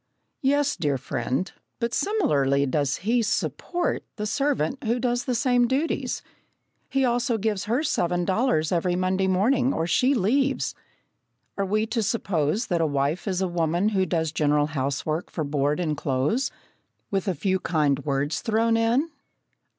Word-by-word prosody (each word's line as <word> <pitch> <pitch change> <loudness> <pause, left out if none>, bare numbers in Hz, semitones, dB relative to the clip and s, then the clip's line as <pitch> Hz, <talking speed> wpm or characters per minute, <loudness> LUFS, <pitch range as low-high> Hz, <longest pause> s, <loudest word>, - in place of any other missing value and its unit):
"Yes, 285 +1 +2
dear 145 -4 0
friend, 130 +5 -2 0.3
but 235 0 -2
similarly 140 - +2
does 140 +1 0
he 235 +2 +3
'support' 345 +9 -1
the 210 - -3
servant 275 - 0
who 235 +1 +1
does 245 0 0
the 250 - 0
same 245 -1 +3
duties. 275 +6 -1 0.7
He 270 -1 +2
also 240 0 +1
gives 210 -2 -1
her 240 +8 0
seven 175 - 0
dollars 185 -6 +1
every 175 0 +1
Monday 185 +1 +1
morning, 245 +8 +2
or 165 - -1
she 255 +10 +3
leaves." 265 +6 +1 0.8
Are 200 -1 -1
we 215 +3 +1
to 225 +1 -1
suppose 200 - 0
that 170 -3 0
a 160 - +2
wife 145 +6 -1
is 190 -1 0
a - - +1
woman 175 +3 +1
who 190 -3 +1
does 160 -2 0
general 150 -1 +2
housework 140 +4 -2
for 160 - -3
board 145 +1 0
and 155 -4 0
clothes, 145 - 0 0.6
with 195 0 -1
a 190 - 0
few 190 +4 0
kind 150 -6 +1
words 145 +2 -1
thrown 225 +1 +2
in? 240 +8 +1
190 Hz, 160 wpm, -25 LUFS, 155-240 Hz, 0.8 s, he